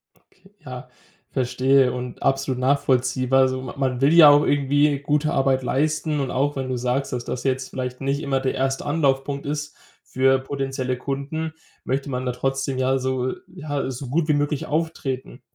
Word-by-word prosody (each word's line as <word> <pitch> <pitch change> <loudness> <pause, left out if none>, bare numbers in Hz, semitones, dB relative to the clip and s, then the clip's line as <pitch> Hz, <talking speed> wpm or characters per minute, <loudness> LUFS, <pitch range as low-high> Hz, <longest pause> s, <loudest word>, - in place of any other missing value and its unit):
Okay, 190 +1 -26
ja, 125 -1 -8 0.4
verstehe 130 0 +2
und 125 -1 -6
absolut 135 -1 0
nachvollziehbar. 130 -1 +2
Also, 130 0 +1
ma 130 - -7
man 130 -2 -1
will 145 +4 +4
ja 160 -3 +10
auch 145 0 +6
irgendwie 145 0 +2
gute 150 +2 0
Arbeit 135 -3 +2
leisten 155 +3 0
und 135 -2 -2
auch 140 +3 0
wenn 130 -1 -3
du 130 - -1
sagst, 125 +2 -1
dass 120 -1 -2
das 125 - -4
jetzt 130 -1 -1
vielleicht 125 0 -5
nicht 140 +2 -1
immer 135 -1 0
der 130 - -1
1. 135 0 -1
Anlaufpunkt 140 -2 0
ist 150 +1 -4 0.3
für 135 0 +2
potenzielle 135 -1 -3
Kunden, 145 +5 -4 0.3
möchte 135 +2 -2
man 125 0 -3
da 125 - -1
trotzdem 135 +1 -2
ja 130 +1 +2
so 130 0 -1
äh, - - -4
ja 150 -7 -4
so 130 +1 -6
gut 155 +4 0
wie 150 - +3
möglich 145 +1 0
auftreten. 150 -4 -3
135 Hz, 180 wpm, -23 LUFS, 130-145 Hz, 0.4 s, ja